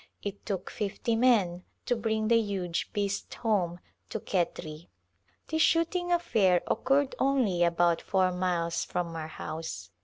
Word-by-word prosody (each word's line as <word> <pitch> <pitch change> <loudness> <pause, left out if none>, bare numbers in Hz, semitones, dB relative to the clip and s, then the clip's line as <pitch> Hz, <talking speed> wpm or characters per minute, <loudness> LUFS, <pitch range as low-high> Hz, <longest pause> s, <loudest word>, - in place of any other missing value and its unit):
It 200 0 -6
took 195 -4 -3
fifty 210 +2 -2
men 210 -8 +3 0.2
to 245 - +1
bring 220 -1 0
the 230 0 +5
huge 190 -5 -2
beast 200 -1 -2
home 185 -6 0 0.3
to 220 - -3
Khetri. 170 -4 -3 0.6
This 315 0 -1
shooting 345 +2 +2
affair 220 - +3
occurred 275 +4 +1
only 245 -11 +2
about 170 0 +3
four 185 -2 +2
miles 175 -2 0
from 170 -2 -3
our 160 -1 -4
house. 155 - -6
195 Hz, 135 wpm, -29 LUFS, 175-230 Hz, 0.6 s, the